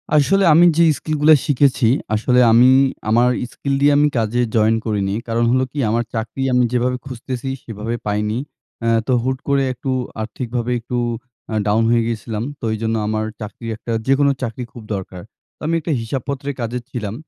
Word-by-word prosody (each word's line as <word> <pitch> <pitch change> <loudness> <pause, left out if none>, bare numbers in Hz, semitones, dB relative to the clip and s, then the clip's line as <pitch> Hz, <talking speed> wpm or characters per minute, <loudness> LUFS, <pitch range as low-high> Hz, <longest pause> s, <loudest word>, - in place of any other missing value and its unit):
আসলে 195 +7 +4
আমি 170 +3 +7
যে 170 - +6
স্কিলগুলা 155 0 +4
শিখেছি, 140 -5 +2 0.3
আসলে 125 +3 +2
আমি 120 +3 +6 0.4
আমার 120 +3 +4 0.2
স্কিল 140 -1 -3
দিয়ে 145 0 +5
আমি 150 +1 +4
কাজে 115 +2 +1
জয়েন 110 0 +4
করিনি। 100 -3 -1
কারণ 115 +1 0
হলো 130 +1 +2
কী, 145 - -5
আমার 120 +2 +1
চাকরি 115 +3 -4
আমি 125 - +4
যেভাবে 125 +1 +1
খুঁজতেসি, 130 0 -5
সেভাবে 115 +1 -4
পাইনি। 105 +2 -1 0.4
অ্যা 115 - 0 0.2
তো 130 - +2
হুট 130 0 -1
করে 140 -1 +2
একটু 125 +2 -6 0.3
আর্থিকভাবে 120 +2 -3
একটু 120 +2 -4 0.5
আ - - -3
ডাউন 110 +2 +3
হয়ে 115 0 +3
গিয়েছিলাম। 110 -1 -3 0.2
তো - - -22
ওই 110 - -1
জন্য 115 0 0
আমার 110 0 -1 0.2
চাকরি 110 +2 -8
একটা 115 +2 -7 0.2
যেকোনো 140 +1 +4
চাকরি 125 0 -4
খুব 120 - -10
দরকার। 95 -1 -7 0.4
তো - - -47
আমি 165 - +1
একটা 160 - -4
হিসাবপত্রের 140 +4 -4
কাজে 120 +1 -2
ছিলাম। 105 -4 -4
120 Hz, 175 wpm, -19 LUFS, 110-135 Hz, 0.5 s, আমি